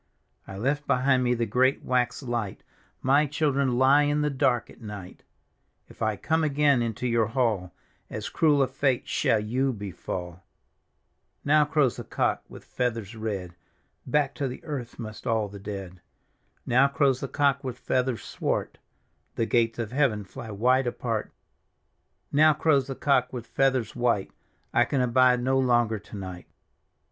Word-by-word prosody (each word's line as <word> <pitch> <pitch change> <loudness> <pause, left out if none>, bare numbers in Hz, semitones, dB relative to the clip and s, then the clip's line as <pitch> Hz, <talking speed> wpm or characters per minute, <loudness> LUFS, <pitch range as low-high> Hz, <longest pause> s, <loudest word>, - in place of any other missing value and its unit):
" - - -46
I 95 - -8
left 140 +7 -1
behind 130 0 +3
me 125 0 +2
the 115 0 0
great 130 +5 +2
wax 125 +1 0
light; 120 -6 -3 0.4
My 140 +3 +4
children 140 -3 +1
lie 135 +3 +5
in 145 0 +1
the 150 0 +1
dark 130 -3 +1
at - - -18
night 105 -4 -9 0.3
" - - -46
If - - -18
I 110 -1 +1
come 160 +9 0
again 145 -3 +3
into 115 +1 -3
your 115 -3 +2
hall, 110 -7 0 0.4
As - - -5
cruel 150 -4 +3
a - - +1
fate 135 -1 0
^all 105 -2 +1
you 130 +4 +1
befall! 90 -4 -6 0.5
" - - -43
Now 150 +1 +5
crows 150 -5 +1
the - - -5
cock - - -1
with - - -12
feathers 115 -4 -3
red, 100 -5 -4 0.5
Back 145 -2 +1
to 140 - +1
the 125 - -8
earth 130 -6 -5
must 110 -2 -8
all 110 -3 +1
the 100 0 -10
dead. 95 -3 -7 0.3
" - - -43
Now 130 +3 +4
crows 140 -2 +2
the 135 - -4
cock 140 0 +1
with 125 -2 -5
feathers 125 -3 -1
swart; - - -3 0.6
The 115 - 0
gates 115 -1 +1
of 115 -2 -4
heaven 130 -7 +1
fly 115 +4 -9
wide 125 +5 +2
apart 115 -2 -3 0.5
" - - -48
Now 155 +1 +5
crows 145 -4 +2
the 135 - -5
cock 135 -3 +2
with 120 -3 -6
feathers 130 -3 0
white; 120 -5 0 0.4
I 120 - +5
can 135 +3 -1
abide 125 0 +3
no 135 +1 +2
longer 120 -4 +2
to 105 +1 -11
night." 95 -2 -8
125 Hz, 175 wpm, -26 LUFS, 110-135 Hz, 0.6 s, lie